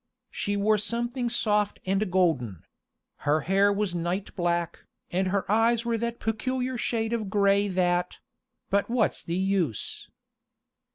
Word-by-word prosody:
She 205 0 -1
wore 210 +1 +3
something 235 +3 -1
soft 210 -3 +1
and 195 +2 0
golden; 145 - +1 0.5
her 150 +2 +1
hair 195 +5 +3
was 200 -2 -1
night 175 +3 -3
black, 175 -2 -1 0.3
and 185 +2 +1
her 195 +1 0
eyes 230 +2 +3
were 230 -1 0
that 235 +1 -3
peculiar 255 +3 -2
shade 230 -1 -1
of 220 -4 -2
gray 200 0 +3
that 180 -1 0 0.5
but 200 +2 +1
what's 235 -2 +1
the 170 - -3
use? 185 - -1
200 Hz, 135 wpm, -27 LUFS, 180-225 Hz, 0.5 s, wore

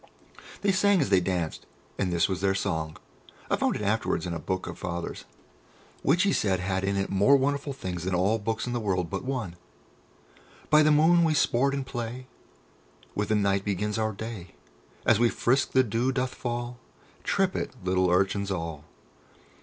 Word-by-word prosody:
They 200 - +3
sang 200 0 +3
as 120 -10 0
they 95 - +6
danced, 85 -3 -3 0.3
and 95 - 0
this 85 0 +2
is 95 -2 -3
their 95 0 +2
song. 80 -5 -2 0.5
I - - +5
found - - 0
it - - -4
afterwards 100 -5 0
in 90 - -3
a 85 - -3
book 95 +4 -3
of - - -7
Father's, 85 -1 -5 0.8
which 170 +7 +3
he 200 -2 +2
said 95 -3 +1
had 95 +1 -1
in 100 +1 0
it 95 - -1
more 100 +9 +5
wonderful 140 +1 -1
things 90 -10 -5
than 95 -1 0
all 100 +5 +2
books 110 +1 -2
in 120 - -3
the 120 - 0
world 90 -6 -1
but 100 - -3
one: 120 -10 -3 1.1
"By 155 0 +7
the 155 - +4
moon 160 +3 +5
we 160 -2 +2
sport 135 +1 +2
and 135 -1 -3
play, 120 0 -5 0.9
With 105 0 -2
the 110 - +3
night 100 -1 +1
begins 105 +2 -1
our 110 0 0
day. 110 -3 -8 0.5
As 110 - +4
we 120 0 +4
frisk 130 +4 +1
the 130 - +5
dew 120 +3 0
doth 130 -1 -1
fall, 120 0 -4 0.4
Trip - - +1
it, - - -3
little 95 0 +2
urchins 95 +2 +1
all. 80 -5 -4
105 Hz, 185 wpm, -27 LUFS, 95-130 Hz, 1.1 s, By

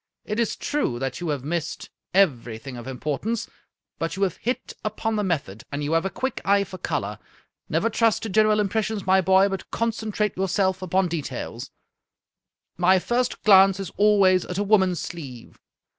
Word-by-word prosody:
It 210 +2 -3
is 235 - 0
true 285 - -1
that 135 0 -3
you 175 -2 -3
have 145 -4 -2
missed 165 +2 -4 0.2
everything 125 - +1
of 120 +1 -8
importance, 150 - -3 0.5
but 165 - -2
you 195 - -1
have 185 -3 0
hit 250 +3 -3
upon 215 +1 -2
the 210 - 0
method, 140 - -2
and 145 +1 -3
you 145 - -2
have 165 +2 +2
a - - 0
quick 260 +8 -3
eye 200 0 +3
for 185 -1 -9
color. - - -3 0.5
Never - - +1
trust 225 -1 +2
to 225 - -3
general 215 +1 +3
impressions, 210 0 -1
my 190 0 +4
boy, 190 +1 +5
but 195 -1 -5
concentrate 220 -2 -1
yourself 190 0 0
upon 185 +1 +1
details. 165 -4 -5 1.1
My 180 +2 +5
first 240 +6 -1
glance 195 -2 +6
is 195 -3 -5
al 210 0 +5
ways 185 -2 +4
at 180 - -5
a 205 - +1
woman's 190 -4 +3
sleeve. 135 -9 -8
190 Hz, 175 wpm, -24 LUFS, 165-210 Hz, 1.1 s, glance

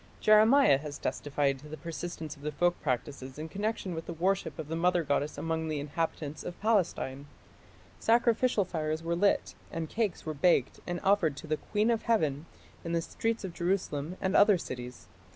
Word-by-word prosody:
Jeremiah 215 - +6
has 145 -1 -6
testified 140 -2 -1
to 150 - -12
the 155 +1 -7
persistence 165 -2 -6
of 145 - -17
the 150 +1 -3
folk 175 +4 +1
practices 130 0 -3
in 155 +1 -5
connection 200 +1 -2
with 165 0 -6
the 170 - -4
worship 190 +4 0
of 160 - -5
the 165 - -3
mother 175 +1 +2
goddess 145 0 -1
among 160 0 -2
the 155 -2 -2
inhabitants 150 0 -3
of 175 - -7
Palestine. 170 -10 0 0.7
Sacrificial 235 -2 +3
fires 155 -2 -2
were 170 0 0
lit 200 +3 +2 0.2
and 165 -2 -4
cakes 215 -6 -1
were 155 - -2
baked 145 -3 +2
and 175 0 -2
offered 190 -8 +3
to - - -8
the 155 0 -1
"Queen 215 +7 0
of 230 - +1
Heaven" 160 - 0 0.4
in 165 - -3
the 165 - +2
streets 225 +4 -2
of 185 -3 -5
Jerusalem 175 -2 -1
and 190 0 0
other 205 -2 +6
cities. 125 -6 -7
165 Hz, 185 wpm, -30 LUFS, 150-195 Hz, 0.7 s, Jeremiah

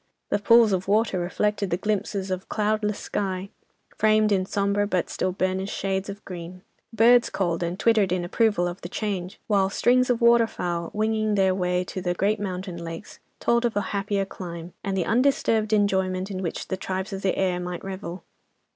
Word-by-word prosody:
The - - +2
pools 230 +1 +6
of 190 0 -1
water 210 -2 +2
reflected 200 +3 -1
the 170 - 0
glimpses 200 -1 -2
of 185 0 -4
cloudless 210 -1 0
sky, 190 -1 -3 0.5
framed 215 0 +4
in 190 -2 +1
sombre 200 +1 +1
but 185 -3 -1
still 185 - -1
burnished 185 +1 -2
shades 195 0 -2
of 200 0 -8
green. 180 0 -8 0.3
Birds 235 +2 +5
called 175 -3 -1
and 175 +2 -3
twittered 215 -5 +3
in 180 -1 0
approval 205 -2 +2
of 175 +1 -6
the 175 - -7
change, 190 -3 -4
while 195 -3 +2
strings 255 +5 +3
of 245 -2 +2
water 235 -1 +5
fowl, 170 -4 -3
winging 215 0 0
their 190 -1 +3
way 180 -1 0
to 185 +1 -6
the 175 -1 -1
great 205 +3 +1
mountain 185 -3 -5
lakes, 165 +4 -8 0.2
told 235 0 +2
of 235 -3 0
a 205 - +2
happier 200 0 0
clime, 170 -3 -8
and 195 -1 -2
the 180 - 0
undisturbed 230 -3 +2
enjoyment 190 -2 +1
in 190 -1 -4
which 170 - -4
the 190 - -1
tribes 190 +1 -4
of 195 - -4
the 195 - 0
air 185 -2 +1
might 180 0 -5
revel. 190 -2 -6
195 Hz, 190 wpm, -25 LUFS, 185-215 Hz, 0.5 s, pools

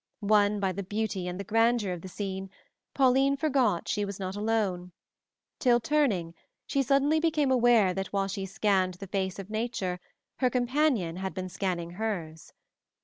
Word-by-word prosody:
Won 205 0 +3
by 195 -1 0
the 195 +2 -4
beauty 200 -1 -3
and 180 +1 -5
the - - -3
grandeur 225 -1 +2
of 175 - -7
the 190 - -8
scene, 190 0 -5 0.5
Pauline 270 +1 +4
forgot 260 - +1
she 205 - 0
was 200 -1 -5
not 190 0 -4
alone, 205 -5 -1 0.7
till 240 -2 +4
turning, 225 - +1 0.3
she 275 - 0
suddenly 280 +4 +3
became 310 -4 +1
aware 240 -6 +4
that 195 +1 -3
while 195 -1 -1
she 195 0 -4
scanned 190 -2 +1
the 195 - -8
face 190 -1 -2
of 195 +1 -8
nature 215 -5 -2 0.4
her 255 - +2
companion 245 - +1
had 190 0 -4
been 185 -1 -4
scanning 175 -2 -3
hers. 175 -6 -4
205 Hz, 165 wpm, -28 LUFS, 185-245 Hz, 0.7 s, Pauline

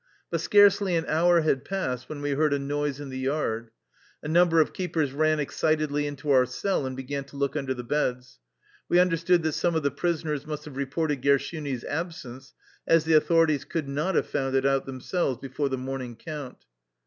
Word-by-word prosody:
But - - -1
scarcely 205 -3 +5
an 165 -1 0
hour 170 +2 +3
had 140 -4 +1
passed 140 -9 -3
when 145 -2 -6
we 145 - -1
heard 145 +1 +2
a - - 0
noise 145 0 -2
in 145 -2 -7
the 130 0 -5
yard. 130 -4 -2 0.5
A - - -5
number 165 +1 +4
of 155 - +2
keepers 165 -6 -1
ran 155 +1 +2
excitedly 150 0 0
into 145 0 -3
our 130 -2 +5
cell 140 +3 -1
and 130 0 -6
began 140 +1 -4
to 140 - -16
look 140 0 -1
under 135 -3 -2
the 125 - -6
beds. 125 -1 -2 0.5
We 175 - +4
understood 175 -1 +3
that 160 - +1
some 170 +2 0
of 160 - 0
the 140 - +1
pris 165 +3 -1
oners 150 -2 -3
must 150 -1 -5
have 150 -3 -10
reported 140 +1 -2
Gershuni's 140 -1 0
absence, 145 -5 -6 0.3
as 165 -1 +4
the 160 - +2
authorities 155 -1 +4
could 160 -4 -4
not 155 +7 -1
have - - +2
found 135 -1 -2
it 135 0 +2
out 135 -1 +1
themselves 135 +1 -2
before 135 +2 -3
the 130 - -2
morning 130 -2 -5
count. 145 0 -8
145 Hz, 200 wpm, -26 LUFS, 135-160 Hz, 0.5 s, scarcely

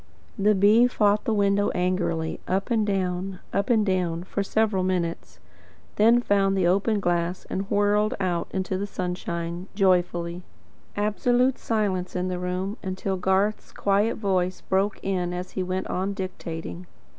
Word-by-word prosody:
The 210 +1 +4
bee 210 +5 +6
fought 210 -3 +2
the - - +1
window 200 -1 +2
angrily, 175 -3 -1
up 195 +6 -1
and 220 -2 +2
down, 185 -1 -1 0.2
up 200 +4 0
and 220 -3 +3
down, 175 -3 0
for 195 +2 -3
several 210 -1 +1
minutes; 180 -2 -2 0.6
then 230 +3 +5
found 195 -3 +2
the 185 - +2
open 200 +4 +2
glass 175 -1 -1
and 195 +1 -3
whirled 205 +1 +2
out 180 -3 -1
into 190 0 -2
the 200 - -2
sunshine, 175 -2 -4
joyfully. 175 -3 +1 0.6
Absolute 245 +5 +2
silence 200 -6 -1
in 180 0 -1
the 180 -1 -3
room, 185 +4 -3
until 190 +1 -3
Garth's 190 +3 0
quiet 205 +3 +1
voice 185 -3 0
broke 195 +2 0
it 180 -2 -1
as 180 +1 -5
he 190 - -3
went 185 +1 -2
on 195 +2 -2
dictating. 175 -2 -6
190 Hz, 150 wpm, -25 LUFS, 180-205 Hz, 0.6 s, bee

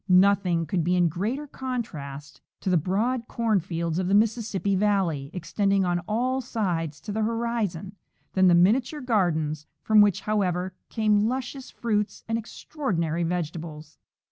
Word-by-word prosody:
Nothing 185 -2 +4
could 170 +2 0
be 180 +3 +2
in 175 -2 +3
greater 215 - -2
contrast 185 - -6 0.2
to 190 - -1
the - - +4
broad 220 - 0
corn 225 -4 +1
fields 170 -1 -2
of 185 - -1
the 195 - +3
Mississippi 210 -2 +1
valley, 185 -8 +1
extending 195 +2 0
oh 175 -1 +1
all 255 +5 0
sides 170 - -2
to 210 - -6
the 220 +2 -1
horizon, 220 -5 -2 0.4
than 190 -1 +4
the 175 - +6
miniature 245 - +3
gardens, 160 - 0 0.2
from 215 -1 +6
which, 205 -3 +3
however, 185 -3 0 0.2
come 215 -2 +2
luscious 260 +2 -4
fruits 210 -3 -2
and 225 - 0
extraordinary 185 - -3
vegetables. 165 -2 -4
195 Hz, 145 wpm, -26 LUFS, 170-225 Hz, 0.4 s, the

